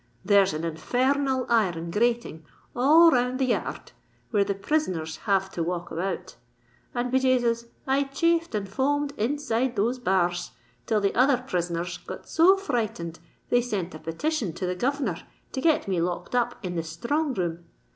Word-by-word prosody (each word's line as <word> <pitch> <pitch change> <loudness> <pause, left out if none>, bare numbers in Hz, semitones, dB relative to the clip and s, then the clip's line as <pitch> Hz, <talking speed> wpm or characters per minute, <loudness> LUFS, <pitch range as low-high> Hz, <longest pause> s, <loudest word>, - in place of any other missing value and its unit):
There's 200 -1 +5
an 155 +1 -4
infer 170 +11 0
r - - +2
nal 265 -2 0
iron 175 -8 +1
grating 230 -6 0 0.3
all 315 +7 +7
round 250 0 +1
the 265 - +1
yar 250 - 0
rd - - -14 0.4
where 205 -3 +3
the 200 0 -2
prisoner 195 - 0
rs 160 0 -7
have 195 -1 +2
to 170 - -4
walk 175 +1 -3
about; 180 +4 -4 0.6
and, 245 0 -1
be 260 - +4
Jasus! 240 -3 +2 0.2
I 275 +1 +2
chafed 335 +1 +1
and 200 -1 -2
foamed 280 +6 0
inside 255 0 0
those 235 +5 0
bar 190 -6 +2
rs, 175 0 -6 0.3
till 215 -2 +2
the 200 - +1
other 255 +2 +4
prisoner 175 -4 -1
rs 175 0 -5
got - - -9
so 365 +4 +5
frightened 220 - -3 0.3
they 245 - +4
sent 205 -7 -3
a 155 - -8
petition 210 - -2
to 185 +3 -4
the 180 - -1
governor 245 - -1 0.3
to 265 - -3
get 315 -6 +2
me 185 -3 0
locked 175 +6 -3
up 245 -1 +1
in 180 - -3
the 165 - 0
sthrong 255 - -1
room. 170 -1 -2
230 Hz, 185 wpm, -26 LUFS, 175-265 Hz, 0.6 s, all